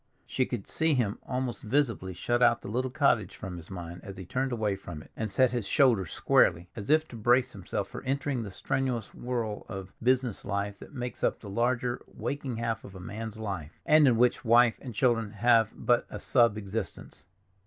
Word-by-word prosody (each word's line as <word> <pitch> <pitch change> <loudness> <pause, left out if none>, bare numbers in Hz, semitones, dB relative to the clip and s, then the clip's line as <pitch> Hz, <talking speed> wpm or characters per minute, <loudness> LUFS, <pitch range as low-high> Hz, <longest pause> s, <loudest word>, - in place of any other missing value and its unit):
She 130 - 0
could 120 -6 -4
see 160 -2 +1
him 110 -5 0
almost 125 -4 -2
visibly 110 -7 0
shut 120 +5 0
out 120 -1 +4
the - - -6
little 125 +5 -1
cottage 125 - +2
from 90 -2 -7
his 85 0 -11
mind 85 -2 -7
as 100 -1 -8
he 95 - -7
turned 130 +7 -1
away 110 -4 0
from 85 -5 -8
it, - - -20
and 110 -1 -3
set 125 +6 +3
his 120 -5 -2
shoulders 115 - +3
squarely, 85 +1 +3
as 105 -2 -7
if 155 +1 +4
to - - -9
brace 120 +3 +3
himself 100 0 -4
for - - -7
entering 135 -1 -1
the 105 - -5
strenuous 125 +1 -2
whirl 115 -4 -3
of 95 -3 -7
business 125 -2 +1
life 100 0 -3
that 150 - -12
makes 125 -1 -5
up - - +1
the 100 - -9
larger, 120 +2 0
waking 135 -4 -4
half 115 -1 -2
of 95 - -11
a - - -8
man's 110 +4 -6
life, 95 -8 -5
and 155 -1 +6
in 120 -3 +4
which 125 +1 +3
wife 120 -1 +5
and 125 -5 -8
children 115 -3 +1
have 115 0 +4
but 120 -1 +2
a 105 - -6
sub 115 -2 +3
existence. 105 -2 -5
115 Hz, 205 wpm, -29 LUFS, 100-125 Hz, -, and